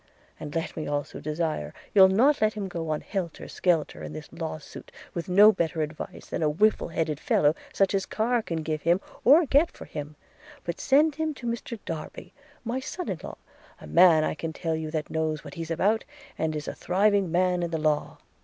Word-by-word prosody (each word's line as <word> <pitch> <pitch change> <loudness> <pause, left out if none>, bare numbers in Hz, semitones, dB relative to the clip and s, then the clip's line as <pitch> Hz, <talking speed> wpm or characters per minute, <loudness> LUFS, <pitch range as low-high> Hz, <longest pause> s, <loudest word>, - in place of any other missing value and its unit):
And 150 +1 -7
let 165 - -2
me 155 - -4
also 145 0 -3
desire 155 - -3 0.2
you'll 190 -2 +8
not 245 +10 +3
let 215 0 +3
him 205 -2 -3
go 165 -3 -4
on 155 -1 -1
helter 185 -6 -4
skelter 170 -4 0
in - - -7
this 155 0 -9
law 165 -1 -4
suit, 155 - -12 0.2
with 170 0 -4
no 205 +4 +8
better 165 -4 -1
advice 150 +1 -7
than - - -4
a 155 - +3
whiffled 175 +1 +2
headed 155 -3 -1
fellow 150 0 +3 0.2
such 195 0 +2
as 195 -1 0
Carr 235 +2 +1
can 165 -6 -4
give 155 -1 -2
him 170 +4 +3 0.2
or 305 +7 +7
get 290 +5 +4
for - - -11
him; 150 0 -7 0.5
but 170 - -4
send 295 +3 +4
him 315 -1 -1
to 255 - -10
Mr 235 0 -3
Darby, 160 -2 -7 0.3
my 245 +2 -2
son 320 +7 -5
in - - -3
law, - - -7 0.4
a - - -11
man 170 -3 +6
I - - 0
can 160 +1 -5
tell 160 0 -2
you 160 -1 -4
that 155 -1 -3
knows 155 -1 -1
what - - -9
he's 165 -2 -6
about, 205 +7 +1 0.3
and 160 -1 -1
is 150 - -5
a - - -3
thriving 195 0 +2
man 180 0 +2
in 170 - -1
the 165 - -1
law. 155 -1 0
170 Hz, 210 wpm, -27 LUFS, 155-210 Hz, 0.5 s, you'll